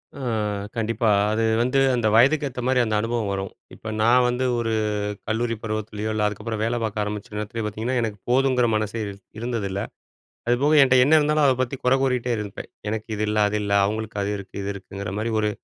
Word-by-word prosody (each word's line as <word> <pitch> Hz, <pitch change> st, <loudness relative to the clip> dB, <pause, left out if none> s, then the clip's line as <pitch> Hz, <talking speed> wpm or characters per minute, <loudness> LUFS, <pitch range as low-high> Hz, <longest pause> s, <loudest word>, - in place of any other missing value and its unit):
அ 140 Hz, -, -9 dB, 0.6 s
கண்டிப்பா. 115 Hz, 0 st, 0 dB, 0.2 s
அது 110 Hz, +1 st, 0 dB, 0.2 s
வந்து 130 Hz, +3 st, +2 dB, 0.2 s
அந்த 120 Hz, -3 st, +1 dB
வயதுக்கு 140 Hz, +5 st, +4 dB
ஏத்த 125 Hz, -, -8 dB
மாரி 130 Hz, -1 st, +3 dB
அந்த 110 Hz, -2 st, -1 dB
அனுபவம் 115 Hz, -3 st, -1 dB
வரும். 95 Hz, 0 st, -3 dB, 0.3 s
இப்ப 110 Hz, -, -7 dB
நான் 125 Hz, +2 st, +5 dB
வந்து 125 Hz, +1 st, 0 dB
ஒரு 115 Hz, -1 st, -1 dB, 0.5 s
கல்லூரி 115 Hz, +1 st, 0 dB
பருவத்திலேயோ, 110 Hz, 0 st, -3 dB
இல்ல 105 Hz, -1 st, +1 dB
அதுக்கப்பறம் 105 Hz, +1 st, -4 dB
வேல 120 Hz, +1 st, 0 dB
பார்க்க 105 Hz, -1 st, -1 dB
ஆரம்பிச்ச 105 Hz, 0 st, -6 dB
நேரத்திலேயோ 105 Hz, +2 st, -4 dB
பார்த்தீங்கன்னா, 110 Hz, +5 st, -2 dB
எனக்கு 110 Hz, -2 st, -3 dB
போதுங்கிற 130 Hz, -1 st, +3 dB
மனசே 110 Hz, +1 st, -2 dB
இர் 100 Hz, -, -5 dB, 0.3 s
இருந்ததில்ல. 110 Hz, -5 st, -2 dB, 0.7 s
அதுபோக 135 Hz, +5 st, +3 dB
என்ட்ட 130 Hz, -1 st, +5 dB
என்ன 145 Hz, +4 st, +3 dB
இருந்தாலும் 150 Hz, 0 st, +2 dB
அத 135 Hz, -, +5 dB
பத்தி 130 Hz, +2 st, -2 dB
குறை 125 Hz, +1 st, +4 dB
கூறிட்டே 125 Hz, -2 st, 0 dB
இருப்பேன். 105 Hz, -2 st, -7 dB, 0.2 s
எனக்கு 110 Hz, 0 st, -3 dB
இது 105 Hz, -, -2 dB
இல்ல, 105 Hz, 0 st, -1 dB
அது 105 Hz, -, -1 dB
இல்ல, 100 Hz, -, -3 dB
அவங்களுக்கு 110 Hz, +1 st, -3 dB
அது 100 Hz, -, -1 dB
இருக்கு, 100 Hz, -1 st, -11 dB
இது 100 Hz, -, -3 dB
இருக்குங்கிற 100 Hz, 0 st, -7 dB
மாரி 115 Hz, +1 st, -1 dB
ஒரு 105 Hz, -, +1 dB
115 Hz, 190 wpm, -23 LUFS, 105-125 Hz, 0.7 s, நான்